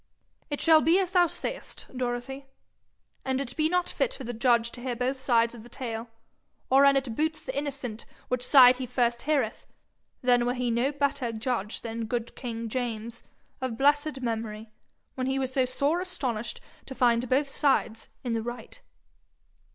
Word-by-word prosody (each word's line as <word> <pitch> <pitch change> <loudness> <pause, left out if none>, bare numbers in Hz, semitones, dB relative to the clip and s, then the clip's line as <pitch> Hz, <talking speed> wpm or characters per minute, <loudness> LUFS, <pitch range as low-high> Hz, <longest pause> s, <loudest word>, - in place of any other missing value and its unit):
'It 290 - -3
shall 320 -1 +6
be 330 +4 +4
as 375 -2 0
thou 355 -2 +5
sayest, - - -6
Dorothy. 255 +2 -4 0.8
An' 265 0 -1
it 255 -2 -4
be 310 0 +2
not 360 0 +1
fit - - -1
for 270 - -8
the 245 0 -4
judge 235 0 +2
to 245 - -9
hear 250 -1 -3
both 255 +3 -1
sides 235 -3 +2
of 235 - -10
the 240 - -13
tale, 230 -2 -5 0.6
or 270 +1 +7
an' 275 0 +6
it 260 -4 -2
boots 315 +3 -1
the 260 - -5
innocent 275 -6 -4 0.2
which 250 0 -1
side 250 -2 +8
he 255 -1 -4
first 240 -1 0
heareth, 275 -8 -1 0.6
then 245 -1 +3
were 245 - 0
he 245 -1 -1
no 240 +4 +1
better 280 -4 -1
judge 225 -2 -2
than 230 0 -4
good 235 +1 -3
king 230 -2 -5
James, 230 -1 -4 0.4
of 255 -3 -3
blessed 290 0 +2
memory, 220 -2 -4 0.4
when 255 -1 -3
he 265 0 0
was 260 -1 -2
so 260 -1 +3
sore 280 +6 0
astonished 260 -12 -3 0.3
to 265 - -7
find 240 -1 +2
both 275 +2 +2
sides 235 -6 +1
in 240 -3 -2
the 225 - 0
right.' 240 - -7
250 Hz, 180 wpm, -27 LUFS, 235-275 Hz, 0.8 s, side